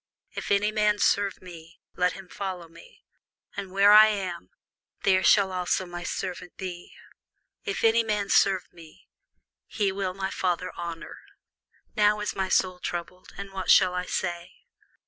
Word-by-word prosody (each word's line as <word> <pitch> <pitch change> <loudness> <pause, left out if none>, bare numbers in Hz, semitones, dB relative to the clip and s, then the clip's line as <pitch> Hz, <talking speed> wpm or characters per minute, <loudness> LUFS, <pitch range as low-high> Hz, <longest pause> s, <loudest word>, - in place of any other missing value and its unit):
If - - -6
any 205 +1 +2
man 210 -1 +2
serve 200 -2 +1
me, 170 -1 -13 0.2
let 180 0 +1
him 190 -1 -11
follow 185 -3 -6
me; - - -18 0.5
and 195 -2 -6
where 200 +2 +5
I 215 +1 +9
am, 185 - -4 0.5
there 185 -1 +3
shall 195 -1 +4
also 185 0 -1
my 175 0 -7
servant 180 0 -5
be: 180 -2 -8 0.7
if 405 - -3
any 230 +1 +4
man 210 -2 -1
serve 190 -2 +3
me, 165 -2 -16 0.6
him 195 -2 -1
will 190 -2 -3
my 195 0 -3
Father 180 -1 -2
honour. 170 -1 -7 0.8
Now 210 0 +3
is 210 - -3
my 190 -1 -2
soul 185 -1 +1
troubled; 180 +1 -6
and 200 -1 -8
what 190 -1 -5
shall 185 -2 +6
I 180 0 -3
say? 175 -1 -3
190 Hz, 155 wpm, -26 LUFS, 180-200 Hz, 0.8 s, I